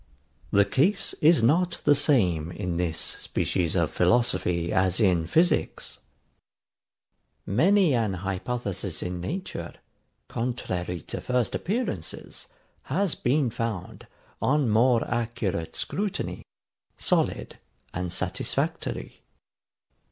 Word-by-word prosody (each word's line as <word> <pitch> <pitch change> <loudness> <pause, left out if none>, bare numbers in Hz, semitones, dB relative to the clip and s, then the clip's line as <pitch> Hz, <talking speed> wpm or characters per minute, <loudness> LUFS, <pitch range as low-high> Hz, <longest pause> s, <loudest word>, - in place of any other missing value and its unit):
The 100 0 +4
case 150 - +2
is 155 -5 +5
not 170 +8 +2
the 145 - +6
same 95 - +2
in 90 -1 -3
this 85 -2 -1
species 85 0 -1
of 85 -4 +1
philosophy 90 -4 +2
as 95 -1 +2
in 90 -6 +3
physics. 170 - +1 1.5
Many 175 - +4
an 110 -5 +1
hypothesis 95 -2 -3
in 90 0 -4
nature, 185 - -5 0.5
contrary 90 -8 -3
to - - -6
first 125 -2 0
appearances, 190 - -3 0.4
has 180 +5 +1
been 130 -1 +1
found, 110 -6 -4 0.3
on 140 -4 +2
more 115 +2 +4
accurate 115 -8 -2
scrutiny, 205 -1 -3 0.6
solid - - 0 0.3
and 90 -1 -3
satisfactory. - - -2
115 Hz, 100 wpm, -26 LUFS, 90-140 Hz, 1.5 s, the